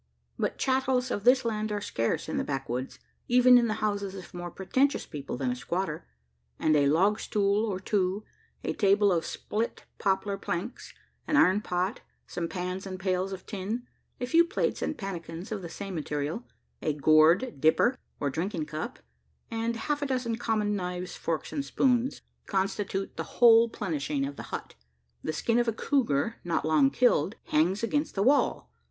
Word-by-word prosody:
But - - -1
chattels 260 -1 +1
of 205 - -3
this 255 0 +5
land 215 -1 -1
are 205 - -1
scarce 115 - -1
in - - -2
the - - +1
backwoods 135 -2 -3 0.3
even 250 +1 +7
in 235 - +2
the 215 - -1
houses 200 -2 -2
of 185 -2 -10
more 175 0 -5
pretentious 260 +11 0
people 140 -5 -6
than 125 -1 -1
a - - -2
squatter; 170 - -3 0.5
and 155 - +2
a 145 -1 +4
log 190 +9 +3
stool 205 +1 +1
or 190 -3 -2
two, 190 +1 0 0.4
a - - -1
table 200 0 +4
of 170 -2 0
split 225 +2 -3
poplar 195 0 0
planks, 185 +6 -4 0.4
an 295 - +2
iron 195 -6 +5
pot, 185 +4 -2 0.2
some 170 -1 -3
pans 180 +2 -4
and 185 -1 -6
pails 185 0 0
of 190 -1 -7
tin, 215 +4 -4 0.3
a 245 - -1
few 330 +7 +5
plates 340 +4 -1
and - - -2
pannikins 175 -3 -6
of 210 -3 -3
the 170 - -7
same 195 +2 -6
material, 150 +6 -3 0.4
a 155 - 0
gourd 155 - +4
"dipper" 160 +11 +4 0.2
or 140 -1 -1
drinking 165 +2 -2
cup, 155 +1 -5 0.5
and 230 +1 -1
half 290 +6 -2
a 285 - 0
dozen 250 -3 -1
common 215 -3 0
knives, 180 -1 -4
forks, 165 -2 -3
and 285 - -1
spoons, 260 -1 +1 0.2
constitute 195 0 -2
the - - -2
whole 230 -1 +7
"plenishing" 150 -9 -2
of 140 - -7
the - - -9
hut. - - -5 0.5
The - - -2
skin 230 +10 +1
of 240 - +1
a 230 - +1
cougar, 225 - 0
not 170 -3 -1
long 155 -4 +4
killed, 205 - +2
hangs 180 +8 +1
against 290 +6 0
the 195 - +1
wall. 280 +5 +2
195 Hz, 175 wpm, -28 LUFS, 165-230 Hz, 0.5 s, even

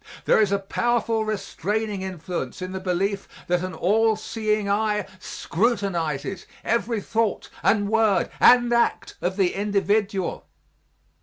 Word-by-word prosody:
There - - +5
is 205 -2 +2
a 200 - +3
powerful 225 +2 0
restraining 210 0 -2
influence 180 -2 -5
in 185 0 -5
the 190 - -4
belief 190 +2 -1 0.2
that 180 -1 +1
an 185 0 -4
all 220 +4 +3
seeing 215 -1 -1
eye 210 0 +1
scrutinizes 190 - -2 0.2
every 230 -1 0
thought 225 +1 -1
and 205 -1 +2
word 220 -2 +2
and 240 -1 +6
act 235 0 +1
of 185 +2 -1
the 190 -3 +2
individual. 200 -1 0
205 Hz, 130 wpm, -24 LUFS, 190-220 Hz, 0.2 s, and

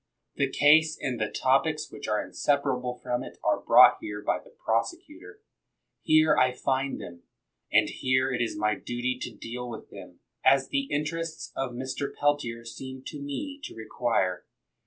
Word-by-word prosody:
The 140 -1 +1
case 155 +3 +5
and 130 -5 -3
the 110 - 0
topics 140 +4 +1
which 145 - -8
are 105 0 0
inseparable 130 -4 0
from 120 0 -1
it - - -10
are - - +2
brought - - +7
here 105 0 -6
by - - +1
the - - -18
prosecutor. 340 - -3 0.6
Here 155 -1 +4
I 130 -2 +3
find 135 +2 -1
them, 85 0 -9 0.5
and - - +5
here 130 0 +1
it 120 - -1
is 120 - -2
my 105 0 +1
dutj' 120 +4 -3
to 120 - -5
deal 120 +3 -6
with 115 - -9
them, - - -12 0.2
as 135 0 +4
the 275 -1 0
interests 160 +2 -3
of 135 -2 -2
Mr. 130 +3 -4
Peltier 135 -6 -1
seem 130 +2 -8
to 150 -3 -7
me 280 - -5
to - - -7
require. 110 -5 -1
130 Hz, 165 wpm, -27 LUFS, 120-145 Hz, 0.6 s, brought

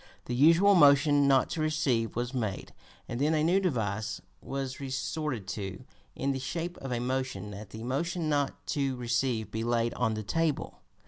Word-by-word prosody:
The 125 - -3
usual 165 +10 +6
motion 145 -3 +6
not 135 -2 +3
to 160 - -2
receive 145 -7 0
was 120 +2 -2
made, 110 -7 -3 0.3
and 120 +2 -4
then 155 +2 +3
a 155 - +2
new 175 +4 +4
device 110 - -1 0.2
was 135 -1 -4
resorted 135 -3 -3
to 95 +2 -5 0.3
in 140 +1 -1
the 135 - -2
shape 170 +6 -4
of 135 - -6
a 120 - 0
motion 125 -5 -2
that 105 0 -9
the 110 +1 -8
motion 160 +7 -1
not 145 -2 -1
to 135 -2 0
receive 120 -2 -1
be 110 +1 -2
laid 120 0 +1
on 110 -3 0
the 110 - -4
table. 155 +8 -1
130 Hz, 180 wpm, -29 LUFS, 115-150 Hz, 0.3 s, usual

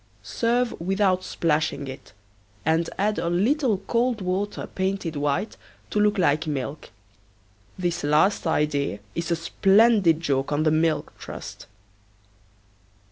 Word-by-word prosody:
Serve 235 - 0
without 190 0 +1
splashing 155 -3 -1
it, 130 0 -9 0.5
and 160 +1 +1
add 210 +2 0
a 170 - -1
little 225 - +2
cold 240 -1 +1
water 190 +2 -2
painted 190 -3 -3
white 145 +8 -1 0.3
to 210 - 0
look 210 0 +3
like 160 -3 +2
milk. 145 +1 -4 0.9
This 175 -2 -2
last 155 +6 +2
idea 145 -7 0 0.2
is 170 +1 -3
a 170 - +2
splendid 195 +1 +4
joke 140 -4 -1
on 145 +1 +1
the 155 - +3
Milk 155 -1 +1
Trust. - - -9
170 Hz, 125 wpm, -24 LUFS, 150-205 Hz, 0.9 s, splendid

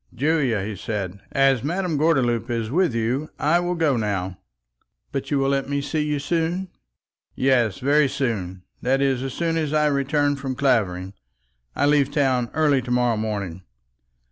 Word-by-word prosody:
"Julia," 135 -6 +1
he 105 +1 -4
said, 100 -1 -4
"as 135 -3 +3
Madame 175 +2 -1
Gordeloup 135 -7 +1
is 115 -2 -2
with 170 -4 +2
you, 125 +7 -1
I 160 +4 +3
will 175 0 -1
now 110 - 0
go." 95 - -13 0.7
"But 135 -1 -4
you 145 - +1
will 135 0 +1
let 135 0 0
me 140 0 0
see 155 +2 -2
you 150 0 0
soon?" 170 +5 -1 0.7
"Yes, 120 -7 +2
very 145 +2 +3
soon; 95 -9 -3 0.2
that 135 +2 +1
is, 135 -2 +1
as 135 -1 -4
soon 165 -1 0
as 155 -2 -1
I 150 0 +3
return 145 0 +1
from 135 -1 -4
Clavering. 100 -9 0 0.6
I 140 - +2
leave 145 -2 +3
town 130 -5 +1
early 150 -4 +3
to 125 - -9
morrow 125 -1 +2
morning." 100 -5 -3
135 Hz, 170 wpm, -23 LUFS, 115-150 Hz, 0.7 s, as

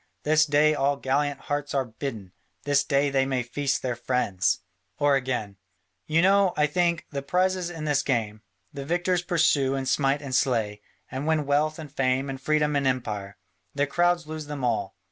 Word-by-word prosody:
This 155 +1 +3
day 150 +1 +4
all 140 -1 +1
gallant 140 +1 -1
hearts 145 0 -3
are 135 -1 +1
bidden; 110 -5 -6 0.3
this 145 0 +2
day 140 0 +1
they 135 -1 +3
may 130 -2 -1
feast 135 +3 -2
their 125 -2 -1
friends." 120 -6 0 0.4
Or 145 -1 +3
again, 125 -7 -2 0.5
"You 160 +2 +3
know, 195 -1 +4
I 150 - +4
think, 170 +2 0
the 140 -2 -3
prizes 180 +4 0
in 165 -3 -6
this 145 -2 +2
game: 110 -6 -1 0.3
the 140 -1 -5
victors 175 +4 0
pursue 160 -6 +2
and 135 -1 -3
smite 140 +1 +1
and 135 -2 -6
slay, 110 -6 +1 0.3
and 135 +2 -4
win 160 -2 +1
wealth 150 +2 +1
and 155 -4 -9
fame 135 0 0
and 135 0 -7
freedom 150 0 +1
and 140 -1 +1
empire: 105 -6 -3 0.4
the 145 0 +2
cowards 175 +3 +1
lose 155 -1 -6
them 145 -3 -5
all. 115 -4 -1
140 Hz, 185 wpm, -26 LUFS, 130-155 Hz, 0.5 s, day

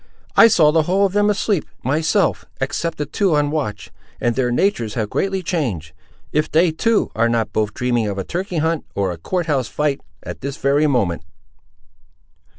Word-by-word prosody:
"I - - +9
saw 165 -9 +5
the 160 +1 +3
whole 190 +5 +2
of 190 - -1
them 205 0 +3
asleep, 200 -3 +1 0.2
myself, 155 +7 +1
except 165 +5 -2
the 150 - -2
two 175 +3 +1
on 145 0 +1
watch; 120 -10 -3 0.3
and 120 -1 0
their 130 -2 +1
natures 120 - 0
have 110 -3 -2
greatly 195 -1 -1
changed, 110 - -2 0.4
if 150 +1 0
they, 165 +2 +4
too, 225 +7 +1
are 115 +1 +2
not 115 -2 -1
both 105 -1 -1
dreaming 120 -3 0
of 100 -1 -3
a 95 - -2
turkey 180 - -4
hunt, 160 0 0
or 100 -2 0
a 85 - -6
court 175 - -2
house 135 -6 0
fight, 150 -2 -1 0.2
at - - -8
this 140 +1 -4
very 145 +3 +2
moment." 100 - 0
150 Hz, 185 wpm, -20 LUFS, 115-175 Hz, 0.4 s, I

